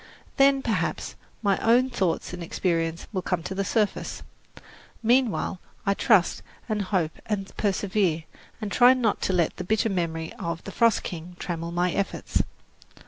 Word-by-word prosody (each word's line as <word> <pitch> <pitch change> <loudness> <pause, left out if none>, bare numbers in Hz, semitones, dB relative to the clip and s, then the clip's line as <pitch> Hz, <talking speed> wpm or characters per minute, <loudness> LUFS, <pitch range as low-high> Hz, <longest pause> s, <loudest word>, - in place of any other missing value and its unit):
Then, 275 0 +5
perhaps, 225 - -1 0.3
my 200 -2 +2
own 250 +3 +4
thoughts 185 -6 -1
and 180 - -6
experiences 165 -1 -1
will 185 - 0
come 180 -2 -1
to 180 - -4
the 195 +1 -1
surface. 210 +1 -1 0.8
Meanwhile 235 -5 +2 0.2
I 200 - +3
trust 200 -3 +3 0.3
and 215 -3 0
hope 185 -5 -1
and 200 -2 -3
persevere, 195 -5 +1 0.4
and 210 -2 -4
try 250 +3 +7
not 235 -5 0
to 190 - 0
let 170 -3 +1
the - - -4
bitter 220 +4 +1
memory 165 -4 -2
of 170 0 -3
"The 195 - -7
Frost 230 +1 +3
King" 175 +1 -6
trammel 170 -2 -4
my 175 +1 +1
efforts. 200 +2 -1
195 Hz, 155 wpm, -26 LUFS, 170-220 Hz, 0.8 s, try